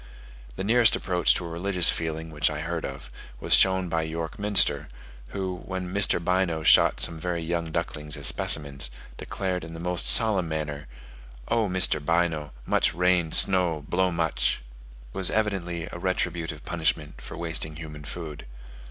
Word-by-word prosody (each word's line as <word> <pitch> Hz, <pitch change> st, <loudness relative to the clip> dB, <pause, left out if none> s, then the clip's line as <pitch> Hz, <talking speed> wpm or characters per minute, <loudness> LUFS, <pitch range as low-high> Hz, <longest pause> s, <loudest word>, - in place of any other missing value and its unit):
The 95 Hz, -, -4 dB
nearest 115 Hz, +2 st, +4 dB
approach 90 Hz, -2 st, +2 dB
to 90 Hz, -, -3 dB
a -, -, -5 dB
religious 90 Hz, +1 st, +1 dB
feeling 80 Hz, 0 st, -4 dB
which 75 Hz, -1 st, +1 dB
I -, -, -5 dB
heard -, -, -3 dB
of, 70 Hz, 0 st, -8 dB, 0.3 s
was -, -, 0 dB
shown 95 Hz, -1 st, +5 dB
by 80 Hz, -1 st, -1 dB
York 80 Hz, +5 st, -5 dB
Minster, 100 Hz, -3 st, +1 dB, 0.4 s
who, 95 Hz, +3 st, -4 dB
when 95 Hz, -1 st, -5 dB
Mr. 100 Hz, -3 st, +1 dB
Bynoe 85 Hz, -2 st, 0 dB
shot -, -, +5 dB
some 80 Hz, -1 st, +2 dB
very 85 Hz, 0 st, -3 dB
young 85 Hz, 0 st, -2 dB
ducklings 75 Hz, -2 st, -3 dB
as 70 Hz, -, -5 dB
specimens, 70 Hz, -3 st, +1 dB, 0.3 s
declared 90 Hz, -2 st, -4 dB
in 80 Hz, 0 st, -9 dB
the -, -, -8 dB
most 90 Hz, 0 st, -1 dB
solemn 100 Hz, -7 st, +3 dB
manner, 75 Hz, -2 st, -4 dB, 0.6 s
"Oh, 115 Hz, -3 st, +1 dB
Mr. 90 Hz, -5 st, +2 dB
Bynoe, 80 Hz, -2 st, 0 dB, 0.2 s
much -, -, +1 dB
rain, 90 Hz, -2 st, +2 dB
snow, 90 Hz, -6 st, +5 dB
blow 95 Hz, +1 st, +1 dB
much." 85 Hz, -7 st, -1 dB
This -, -, -20 dB
was 95 Hz, -2 st, +3 dB
evidently 95 Hz, -6 st, -2 dB
a 85 Hz, -, -7 dB
retributive 85 Hz, -5 st, -3 dB
punishment 80 Hz, -3 st, -2 dB
for -, -, -9 dB
wasting 80 Hz, -2 st, -2 dB
human 75 Hz, -2 st, -9 dB
food. 75 Hz, -2 st, -8 dB
85 Hz, 160 wpm, -26 LUFS, 80-90 Hz, 0.6 s, shown